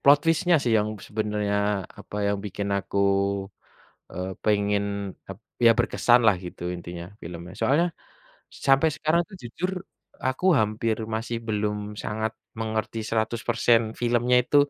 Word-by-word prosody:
plot 140 +1 +8
twist-nya 165 +1 +3
sih, 120 - +1
yang 105 0 0 0.2
sebenarnya, 105 -1 -1 0.4
apa 105 - -8
yang 100 0 0
bikin 100 0 -3
aku, 100 0 -3 1.1
eee, 90 +1 -4
pengen 105 -1 +2 0.5
ap 95 - -6 0.3
ya, 115 - +9
berkesan 120 0 +4
lah 105 - +6
gitu 90 - -9
intinya 85 0 -7 0.2
filmnya. 85 +2 -8
Soalnya 160 +6 +3 0.8
sampai 135 +4 +5
sekarang 155 +2 +2
itu 205 - -13
jujur 165 +10 -3 0.5
aku 130 +6 -2
hampir 110 +1 +1 0.2
masih 115 +1 -2
belum 105 -1 -1 0.3
sangat 110 +1 -2 0.2
mengerti 110 0 -2
100% 115 +1 +2 0.2
filmnya 120 +1 +3
itu, 145 - +1
110 Hz, 130 wpm, -26 LUFS, 105-120 Hz, 1.1 s, ya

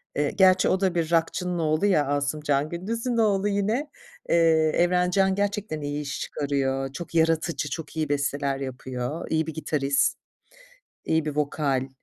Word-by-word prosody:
eee, 145 0 0
gerçi 185 -1 +4
o 185 - +2
da 190 -2 0
bir 165 -1 -1
rockçının 175 +1 0
oğlu 155 +4 +1
ya, 155 -8 +3
Asımcan 145 0 0
Gündüz'ün 230 +8 -3
oğlu 205 -3 +2
yine. 210 +8 0 0.4
Eee, - - +3 0.4
Evrencan 180 +2 +2
gerçekten 205 -5 -2
iyi 145 +1 -3
iş 145 -1 -5
çıkarıyor, 135 -2 -2
çok 165 +3 -8
yaratıcı, 160 -1 +1
çok 160 +4 -6
iyi 155 -2 -1
besteler 140 -1 -1
yapıyor, 130 +3 -5
iyi 160 0 0
bir 160 - -4
gitarist, 140 -3 0 0.9
iyi 160 -1 +1
bir 150 -1 -4
vokal. 140 -3 0
160 Hz, 150 wpm, -25 LUFS, 145-185 Hz, 0.9 s, gerçi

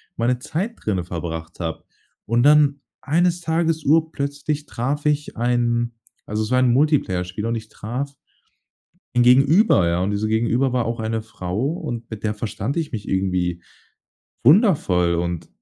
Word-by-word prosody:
meine 120 +2 0
Zeit 170 - -3
drinne 95 -5 -1
verbracht 85 -1 -6
habe. 80 -2 -4 0.4
Und 120 +2 +2
dann 145 -1 +5 0.2
eines 175 +3 +1
Tages, 165 -1 0
urplötzlich 150 -1 0
traf 140 +3 -3
ich 150 0 0
einen 120 0 +1 0.3
also 105 +1 -2
es 110 - -3
war 125 - +4
ein 130 -1 +4
Multiplayerspiel 105 - +1
und 115 +1 -1
ich 110 -1 -6
traf 125 +7 -5 1.0
ein 120 - +5
Gegenüber, 135 - +5
ja. 85 +1 +1
Und 100 - -1
dieser 105 +1 -1
Gegenüber 120 +4 +1
war 125 -2 +1
auch 115 0 -3
eine 110 0 -2
Frau 90 -3 -5
und 135 -10 -5
mit 110 -1 -7
der 105 -1 -1
verstand 110 - -3
ich 160 -3 -2
mich 105 -4 -5
irgendwie 90 -2 -1 0.8
wundervoll. 135 - +4
Und, 85 0 -3
120 Hz, 155 wpm, -22 LUFS, 105-145 Hz, 1.0 s, dann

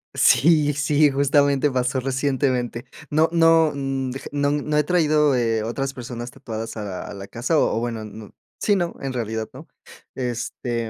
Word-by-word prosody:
Sí, 150 -1 +4
sí, 145 +1 +3
justamente 140 +1 +2
pasó 130 0 0
recientemente. 130 -2 -1 0.2
No 155 +2 +3
no 165 -2 +5
mm, 135 -2 -2 0.2
no 145 0 0
no 150 +1 -1
he 150 - +4
traído, 150 -4 +3
eh, 115 -2 +1
otras 135 +4 -3
personas 120 0 -7
tatuadas 115 -4 -7
a 105 - -4
la 95 -2 -5
a - - -8
la 100 0 -8
casa, 125 +9 0
o - - +1
o - - 0
bueno 115 -2 -3
n 110 0 -10 0.3
sí, 205 - +3
¿no?, 175 -1 -2
en 135 - -3
realidad 110 -3 -3
no. - - -12 0.5
Este, 120 -1 -3
135 Hz, 170 wpm, -22 LUFS, 120-145 Hz, 0.5 s, no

